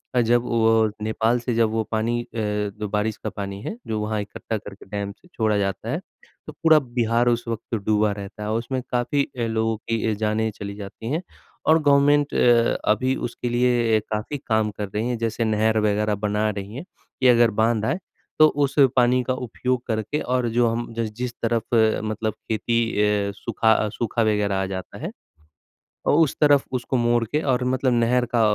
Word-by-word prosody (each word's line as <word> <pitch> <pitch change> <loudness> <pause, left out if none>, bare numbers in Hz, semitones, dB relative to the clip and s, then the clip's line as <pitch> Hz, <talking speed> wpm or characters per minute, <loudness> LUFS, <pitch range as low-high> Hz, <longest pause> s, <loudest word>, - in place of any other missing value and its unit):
और 125 - +5
जब 120 +1 +3
वो 110 -1 +3
नेपाल 110 +2 +1
से 120 +1 -2
जब 115 -1 +3
वो 110 0 0
पानी 115 +2 0
अ, - - -18
जो 105 -1 -2
बारिश 105 +1 -1
का - - -1
पानी 100 -1 -6
है 220 - -5
जो 110 -1 -2
वहाँ 105 0 -1
इकट्ठा 110 +2 -5
करके 100 -1 -11
डैम 100 -1 -3
से 180 - -19
छोड़ा 110 -2 +1
जाता 95 -1 -2
है - - -1 0.5
तो - - -7
पूरा 160 -1 +5 0.2
बिहार 115 +1 +2
उस 120 0 0
वक़्त 115 0 -4
डूबा 105 -1 +2
रहता 100 +1 -7
है 105 - -3
और 110 - +1
उसमें 130 +2 -3
काफ़ी 125 +3 +1 0.2
अ, - - -1
लोगों 110 0 0
की 115 +1 -3
अ, - - +1
जानें 110 +1 0
चली 100 0 -5
जाती 105 +3 -8
हैं। 160 +4 0 0.5
और 160 +1 +6
गवर्नमेंट 145 0 +4
अ, 120 -1 +4
अभी 130 +5 +1
उसके 120 +1 -5
लिए 120 -2 +2
अ, - - +1
काफ़ी 110 +7 -3
काम 110 -2 +1
कर 105 -1 -5
रही 115 +4 0
है। 120 - -1
जैसे 115 0 -1
नहर 110 0 +2
वग़ैरह 105 0 +1
बना 105 +1 +1
रही 100 +1 -6
हैं 140 - -5 0.4
कि 130 - +5
अगर 120 -2 +5
बाँध 110 -1 +1
आए, 170 - 0 0.4
तो 155 - +9
उस 140 -1 -1 0.2
पानी 125 0 +4
का 130 - -1
उपयोग 125 0 -2
करके 110 +6 -1
और 125 -1 0
जो 120 +1 +2
हम 115 0 -3
जिस 115 -2 -2
जिस 125 +1 -4
तरफ़ 115 0 0
अ, 110 -1 +3
मतलब 110 0 -2
खेती 115 +1 -1 0.2
ए 105 -1 +1
सूखा 110 -1 +1
सूखा 115 +2 -2
वग़ैरह 105 -2 +1
आ - - 0
जाता 95 -1 -6
है - - -3 1.0
और - - +4
उस 155 -5 +3
तरफ़ 145 -2 +5
उसको 125 +1 -1
मोड़ 120 0 +2
के 150 +7 -1
और 125 0 0
मतलब 130 -1 +1
नहर 120 +1 +2
का 115 - +4
115 Hz, 200 wpm, -23 LUFS, 105-120 Hz, 1.0 s, तो